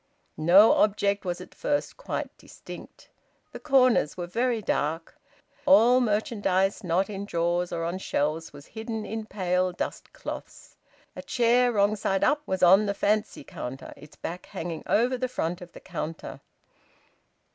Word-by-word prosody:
No 180 +7 +7
object 200 -1 +1
was 175 -1 -2
at - - -12
first 290 0 -2
quite - - -5
distinct. - - -12 0.4
The - - -8
corners 255 - +3
were 175 - -3
very 235 +6 0
dark. 165 -4 -2 0.5
All 250 -2 +6
merchandise 205 -3 0
not 180 +2 +1
in 200 -2 -5
drawers 175 -1 -1
or 165 -1 -2
on 170 +3 -3
shelves 155 -1 -2
was 145 0 -13
hidden 220 -1 -5
in 220 0 -5
pale 185 -2 0
dust 175 - -5
cloths. - - -9 0.4
A - - -6
chair 245 0 +2
wrong 205 0 +3
side 195 -2 -1
up 295 0 +3
was 190 -1 -1
on 195 +4 +6
the 200 - -1
fancy 210 -5 0
counter, 135 0 -7
its 150 - -15
back 175 +2 -7
hanging 165 -1 -5
over 245 +3 +2
the 255 - 0
front 175 -8 -3
of 175 -1 -10
the - - -11
counter. 165 -2 -6
195 Hz, 155 wpm, -26 LUFS, 175-225 Hz, 0.5 s, No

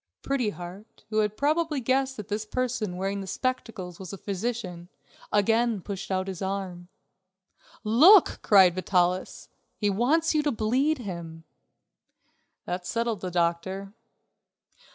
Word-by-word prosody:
Pretty 270 -5 0
Heart, 185 +2 -10
who 215 - +2
had 210 0 0
probably 305 +2 +1
guessed 265 +2 0
that 210 - -7
this 210 +1 -2
person 230 -5 -2
wearing 195 +1 -2
the 195 - -7
spectacles 220 -6 -3
was 185 -3 -7
a 195 - -6
physician, 190 -4 -4 0.4
again 225 +2 +2
pushed 195 +1 -6
out 190 0 -1
his 190 -1 -6
arm. 190 -2 -4 1.0
"Look," 315 - +6
cried 190 -4 +6
Vitalis, 180 0 0 0.3
"he 205 -2 +1
wants 295 +12 +2
you 305 - +3
to 295 -1 0
bleed 255 +7 +1
him." 170 -7 -7 1.2
That 180 0 -4
settled 230 -4 -1
the 185 - -3
doctor. 180 +3 -1
205 Hz, 130 wpm, -27 LUFS, 185-245 Hz, 1.2 s, Look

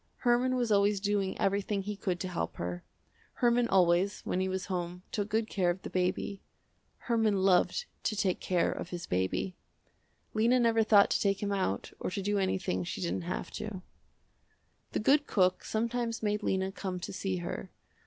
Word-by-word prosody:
Herman 250 +1 +2
was 240 -3 0
always 200 0 +3
doing 200 -1 0
everything 200 0 0
he 210 +1 -4
could 185 -2 -2
to 185 - -2
help 170 - -3
her. 90 0 -4 0.5
Herman 240 0 +3
always, 185 +1 +3
when 180 - -2
he 190 0 0
was 185 -1 -2
home, 180 -1 -4
took 205 0 -2
good 220 +1 +1
care 185 -5 +1
of 175 +2 -2
the - - -6
baby. 185 +2 -1 0.6
Herman 225 -3 +1
loved 195 - +3 0.2
to 215 - +1
take 190 -3 0
care 180 -2 +1
of - - -5
his 175 -1 -5
baby. 95 - -1 0.8
Lena 235 +4 +3
never 230 -1 +4
thought 210 -2 +5
to - - +2
take 200 0 +1
him 200 - -1
out 190 - -1
or - - -2
to 195 +1 -3
do 205 +1 +1
anything 190 -1 0
she 175 - -5
didn't 170 -1 -2
have - - -3
to. 195 -4 -6 1.1
The - - +1
good 285 +6 +4
cook 185 -2 +2
sometimes 230 +1 -2
made 210 0 0
Lena 190 -1 0
come 190 -2 -4
to 175 - -6
see 190 -1 -2
her. 175 +1 -5
195 Hz, 185 wpm, -31 LUFS, 185-215 Hz, 1.1 s, thought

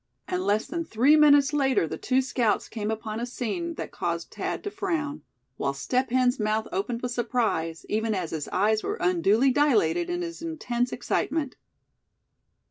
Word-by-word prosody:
And 365 0 -1
less 210 +2 +1
than 335 +4 -3
three 270 +2 +4
minutes 290 -1 +6
later 270 - +2
the - - -4
two 260 +1 +1
scouts 240 -4 0
came 215 -2 -4
upon 220 0 -3
a 240 - -2
scene 325 +8 -3
that - - -6
caused - - -3
Thad - - -4
to 410 - -4
frown; 305 -8 -2 0.4
while 140 0 -1
Step 255 - 0
Hen's 250 +1 +2
mouth 215 +1 0
opened 230 +5 -2
with 250 - -2
surprise, 220 -9 -1
even 220 0 0
as 180 -4 -3
his 155 -3 -4
eyes 215 +3 +2
were - - -2
unduly 195 +9 +3
dilated 290 - +2
in 350 0 -2
his 335 -1 -6
intense 250 -7 -2
excitement. 295 -5 -1
245 Hz, 170 wpm, -26 LUFS, 215-290 Hz, 0.4 s, minutes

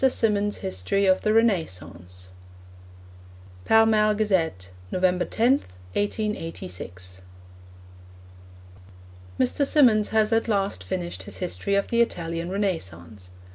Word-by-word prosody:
SYMONDS' 210 -5 +2
HISTORY 95 - 0
OF 185 -1 +3
THE 215 - +1
RENAISSANCE 90 - -1 1.4
(Pall 225 0 +6
Mall 215 -1 +3
Gazette, 165 - 0 0.2
November 180 -1 +1
10, 250 +5 +2 0.3
1886.) 95 - -4 2.2
Mr. 130 - +2
Symonds 245 -8 +4
has 220 0 +2
at 225 +1 +2
last 200 -2 -1
finished 175 -2 -4
his - - -8
history 190 +2 -1
of 200 - 0
the 235 0 +3
Italian 170 -6 -2
Renaissance. 105 - -3
190 Hz, 100 wpm, -25 LUFS, -, 2.2 s, Pall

